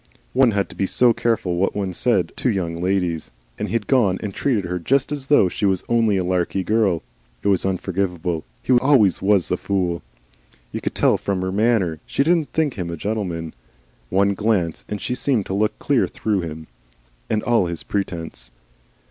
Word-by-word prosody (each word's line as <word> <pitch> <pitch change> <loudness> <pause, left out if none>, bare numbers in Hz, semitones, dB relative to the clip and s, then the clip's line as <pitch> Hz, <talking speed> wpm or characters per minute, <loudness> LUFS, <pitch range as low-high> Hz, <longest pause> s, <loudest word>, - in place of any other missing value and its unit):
One 130 -1 +5
had 100 -3 0
to - - -11
be 95 - 0
so 120 +3 +4
careful 105 -8 0
what 95 - 0
one 100 -2 -2
said 90 -4 +1
to 130 - +1
Young 85 -6 -2
Ladies, 90 -4 0 0.3
and - - -2
he'd 115 -2 -1
gone 110 -9 +3
and 100 -2 -4
treated 115 -7 0
her 90 +1 -3
just 135 - +1
as 140 -2 -4
though 145 -10 +5
she 95 - -6
was 95 -2 +2
only 115 -4 +2
a 95 - 0
Larky 90 +1 0
Girl. 105 -5 +1 0.4
It - - +2
was 95 -1 +2
unforgivable. 90 -3 -2 0.2
He 130 - +2
always 125 -6 +4
WAS 100 -2 +2
a - - +2
fool. 90 -4 -1 0.7
You - - -4
could - - -3
tell - - +3
from 95 -2 -2
her 95 - -1
manner 100 -6 +1
she - - +1
didn't 165 -1 +2
think 150 -9 0
him 85 -2 -3
a 85 - -5
gentleman. 90 -5 -3 0.6
One 100 +1 +2
glance, 100 -5 0
and 105 - -3
she 125 - -2
seemed 125 -5 +1
to - - -4
look 105 +2 0
clear - - +1
through 105 -3 -1
him 80 -1 -6 0.6
and 105 - 0
all 115 -7 +2
his 85 -1 -4
presence. 80 -11 -4
100 Hz, 190 wpm, -22 LUFS, 90-115 Hz, 0.7 s, One